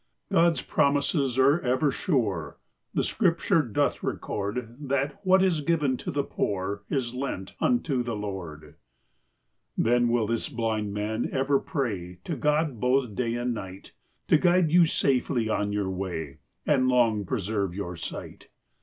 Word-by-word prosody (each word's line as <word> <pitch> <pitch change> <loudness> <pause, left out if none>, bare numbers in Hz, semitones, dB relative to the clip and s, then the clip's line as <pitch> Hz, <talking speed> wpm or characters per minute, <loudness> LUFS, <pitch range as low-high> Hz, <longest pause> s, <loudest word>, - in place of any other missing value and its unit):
God's 170 -1 +3
promises 140 -2 +1
are 140 +5 +5
ever 130 0 +1
sure, 110 - -1
• - - -46 0.3
The - - 0
scripture. 170 0 +2
<doth 120 -8 0
record 115 +3 -3
That 140 +4 -1
what 190 0 +5
is 175 -5 +2
given 150 -4 +1
to - - -6
the 145 0 0
poor! 100 -4 -2
Is 125 -4 -1
lent 125 -7 -4
unto 160 - +1
the 120 -2 -3
Lord. 95 -7 -6
I 75 0 -15 1.0
Then 120 +1 +3
will 120 -2 +2
this 115 +5 -1
blind 110 -5 -2
man 105 +3 -2
over 135 +1 +2
pray! 95 - -3
To - - -3
God 150 -4 0
both 125 -2 +1
day 115 +2 -1
and 120 0 -1
night 95 -3 -8
I - - -43
To - - +8
guide 175 -2 +3
you 170 0 +6
safely 125 -6 +1
on 105 -1 0
your 100 -2 -1
way,! 85 -6 -5 0.3
And 130 -4 +3
long 115 -5 +3
preserve 100 -3 -2
your 90 -3 -4
sight. 85 - -7
120 Hz, 155 wpm, -27 LUFS, 105-140 Hz, 1.0 s, To